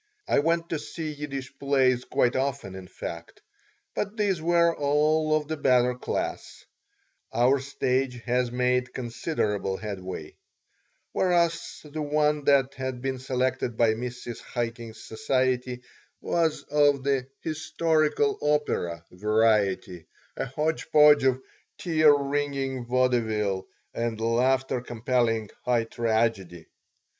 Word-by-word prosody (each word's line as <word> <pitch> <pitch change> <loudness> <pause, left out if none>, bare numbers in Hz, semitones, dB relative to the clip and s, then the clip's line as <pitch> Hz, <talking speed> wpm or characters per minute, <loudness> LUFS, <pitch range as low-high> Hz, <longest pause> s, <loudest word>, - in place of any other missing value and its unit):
I - - +3
went 165 +2 +1
to 160 - -2
see 155 +1 -5
Yiddish 140 -3 -6
plays 130 -3 +2
quite 120 - +1
often, 135 -7 -2
in 95 -1 -9
fact, 85 -1 -8 0.5
but 210 +2 -3
these 200 -6 +1
were 170 0 +3
all 155 +2 +2
of 150 -1 -1
the 160 0 -3
better 125 -3 +3
class 125 - -4 0.7
(our 125 +4 +3
stage 130 -1 -1
has 125 0 0
made 125 0 0
considerable 110 - -2
headway), 95 -7 -7 0.7
whereas 170 -2 0
the 155 +1 -6
one 150 0 +1
that 140 -2 +4
had 130 -1 -5
been 135 -1 -2
selected 130 -2 -1
by 115 -2 +4
Mrs. 120 0 -6
Chaikin's 115 -1 -4
society 125 +1 -1 0.4
was 165 -2 0
of 145 -2 +2
the 135 -2 0
"historical 160 - 0
opera" 90 - 0
variety, 100 -3 +1 0.3
a - - -2
hodge 150 +5 -2
podge 150 -2 +6
of 130 -1 +3 0.4
"tear 155 -3 +4
wringing" 140 -3 -1
vaudeville 110 -6 +1 0.3
and 115 -1 -2
"laughter 125 +3 +1
compelling" 115 -2 0
high 120 -2 +2
tragedy. 110 -7 -1
130 Hz, 115 wpm, -26 LUFS, 115-150 Hz, 0.7 s, podge